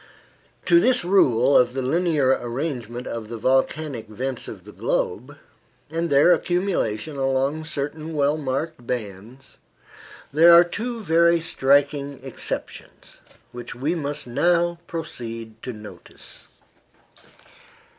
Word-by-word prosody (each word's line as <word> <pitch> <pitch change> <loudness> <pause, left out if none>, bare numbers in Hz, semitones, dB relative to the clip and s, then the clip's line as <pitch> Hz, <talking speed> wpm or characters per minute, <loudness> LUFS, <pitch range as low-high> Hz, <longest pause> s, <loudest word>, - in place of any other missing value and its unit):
To 340 - +6
this 250 - +2
rule 140 - +4
of 125 0 +4
the 135 - -2
linear 155 -1 +1
arrangement 125 -2 -3
of 115 -2 -6
the 115 - -5
volcanic 130 +1 0
vents 125 +5 -5
of - - -9
the - - -12
globe, - - -2 0.5
and 165 +1 -1
their 145 +5 +6
accumulation 160 - -1
along 135 +3 0
certain 155 +2 -3
well 145 0 +2
marked 140 -2 -4
bands, 115 +3 -6 0.7
there 165 +3 +7
are 170 +1 +9
two 230 +6 -5
very 170 0 +4
striking 140 -2 +1
exceptions, 135 -3 -7 0.3
which 120 -1 -8
we 140 +7 -1
must 150 -3 -3
now 170 +7 +1
proceed 115 -9 -7
to 125 - -5
notice. 105 -2 -12
140 Hz, 115 wpm, -23 LUFS, 125-165 Hz, 0.7 s, are